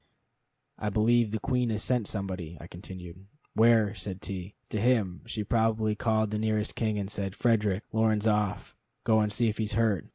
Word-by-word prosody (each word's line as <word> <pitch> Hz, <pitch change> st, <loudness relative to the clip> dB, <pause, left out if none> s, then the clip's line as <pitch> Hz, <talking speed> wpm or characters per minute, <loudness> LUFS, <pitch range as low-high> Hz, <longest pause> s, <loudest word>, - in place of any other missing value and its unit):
"I 105 Hz, -, -1 dB
believe 110 Hz, +2 st, +3 dB
the 110 Hz, +1 st, -2 dB
Queen 125 Hz, -2 st, 0 dB
sent 115 Hz, 0 st, 0 dB
somebody," 95 Hz, -5 st, -4 dB
I -, -, -9 dB
continued. 90 Hz, 0 st, -10 dB, 0.3 s
"Where?" 110 Hz, -2 st, +4 dB
said 95 Hz, -1 st, -6 dB
T. 95 Hz, 0 st, -6 dB
"To 105 Hz, -, -2 dB
him. 110 Hz, -7 st, +2 dB
She 110 Hz, -2 st, -3 dB
probably 110 Hz, 0 st, +1 dB
called 110 Hz, 0 st, +1 dB
the 105 Hz, -, -1 dB
nearest 110 Hz, -1 st, 0 dB
king 110 Hz, -2 st, -1 dB
and 100 Hz, -1 st, -2 dB
said: 100 Hz, -1 st, -4 dB
'Frederick, 105 Hz, -4 st, +1 dB
Lorne's 110 Hz, -1 st, +2 dB
off. 105 Hz, -3 st, 0 dB, 0.3 s
Go 110 Hz, -1 st, +4 dB
and 105 Hz, -1 st, +1 dB
see 115 Hz, +3 st, +2 dB
if 110 Hz, 0 st, -2 dB
he's 110 Hz, -1 st, 0 dB
hurt.'" 110 Hz, -4 st, +1 dB
105 Hz, 175 wpm, -29 LUFS, 100-110 Hz, 0.3 s, Where